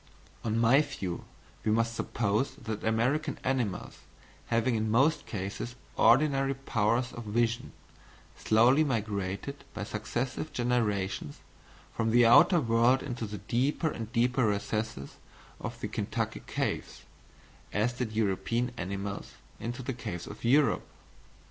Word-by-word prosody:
On 110 -1 0
my 120 +5 +5
view 100 - -5 0.4
we 110 - +1
must 115 +1 +2
suppose 115 +1 -1
that 110 -1 -5
American 130 +7 +1
animals, 125 -7 -2 0.5
having 115 +2 +2
in 110 -1 0
most 135 +8 +3
cases 105 +4 -4 0.2
ordinary 135 +3 +4
powers 120 -1 0
of 120 - -7
vision, 120 +3 0 0.6
slowly 120 +7 +4
migrated 105 0 -2
by 105 - -3
successive 120 +8 -3
generations 105 -10 -1 0.6
from 115 -1 0
the 120 +1 +5
outer 120 +9 +7
world 120 0 +3
into 120 -5 -4
the 105 0 -6
deeper 130 - 0
and 115 -1 -6
deeper 125 0 +2
recesses 105 -4 -2 0.4
of - - -6
the - - -2
Kentucky - - -3
caves, - - -3 0.7
as 110 +4 +1
did 125 -3 -3
European 115 +3 0
animals 100 0 -4 0.3
into 120 +3 -5
the 135 - -2
caves 105 -8 -5
of - - -10
Europe. 140 +5 +3
115 Hz, 125 wpm, -30 LUFS, 105-125 Hz, 0.7 s, outer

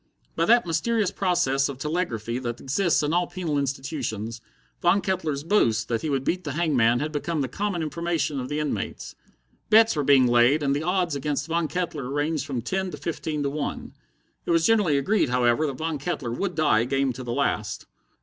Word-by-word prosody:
By 165 - +1
that 235 +1 +5
mysterious 200 +5 0
process 170 -8 +1
of 140 - -6
telegraphy 130 - -2
that 120 -2 -4
exists 155 +4 +1
in 150 +2 0
all 175 0 +2
penal 175 -5 -2
institutions, 130 -5 -3 0.4
Von 175 +3 +4
Kettler's 175 -7 -2
boast 115 - +2
that 115 -2 0
he 155 - -2
would 135 -2 0
beat 180 +6 -1
the 145 -4 -4
hangman 130 -8 +2
had 150 +1 -2
become 155 +1 -2
the 135 - -1
common 190 - -2
information 155 -2 -2
of 125 - -5
the 150 - -2
inmates. 150 -1 -4 0.6
Bets 225 -1 +6
were 150 - 0
being 135 -2 +5
laid, 120 +5 +4
and 140 0 +1
the 145 - -1
odds 180 -2 0
against 145 +1 -2
Von 165 0 0
Kettler 155 -7 -3
ranged 145 0 -1
from 125 -5 -3
ten 190 +8 -2
to - - -7
fifteen 155 -2 -3
to 140 - -1
one. 145 0 -4 0.5
It - - -4
was 165 -1 +3
generally 205 -10 +3
agreed, 195 - +1
however, 125 +4 +2
that 135 -3 -4
Von 160 -2 -3
Kettler 145 -5 -3
would 180 +9 -2
die 145 -8 +3
game 135 0 0
to 130 +2 -7
the 120 - -4
last. - - -1
150 Hz, 200 wpm, -25 LUFS, 135-175 Hz, 0.6 s, Bets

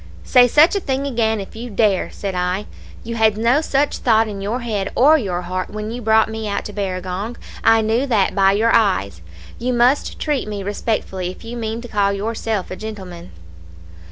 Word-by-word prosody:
"'Say 250 -1 +5
such 300 - +5
a - - +2
thing 275 -5 -2
again 225 -5 0
if 195 - -8
you 240 +2 -7
dare,' 205 -3 +1
said 195 -2 -5
I. 180 +3 -1 0.4
'You 230 - -5
had 220 -2 +3
no 235 +7 +3
such 285 -2 0
thought 225 -3 +3
in 200 -2 -6
your 220 +6 -2
head 210 -4 -2
or 295 +5 +6
your 185 - -2
heart 185 +1 -3
when 215 +1 -5
you 245 +1 -5
brought 220 0 +4
me 220 0 -5
out 200 0 -2
to 210 - -7
Barragong. 190 +2 -4 0.3
I 225 0 +5
knew 225 +5 0
that 215 -7 +2
by 195 0 +4
your 225 +3 +2
eyes. 140 - +1 0.4
You 250 +1 -1
must 245 +4 +2
treat 295 -7 -1
me 205 -2 -4
respectfully 195 -2 -2
if 185 - -11
you 235 +1 -6
mean 225 0 -4
to 245 - -8
call 200 -3 +1
yourself 215 0 -3
a - - -4
gentleman.' 185 -5 -8
220 Hz, 200 wpm, -20 LUFS, 195-235 Hz, 0.4 s, or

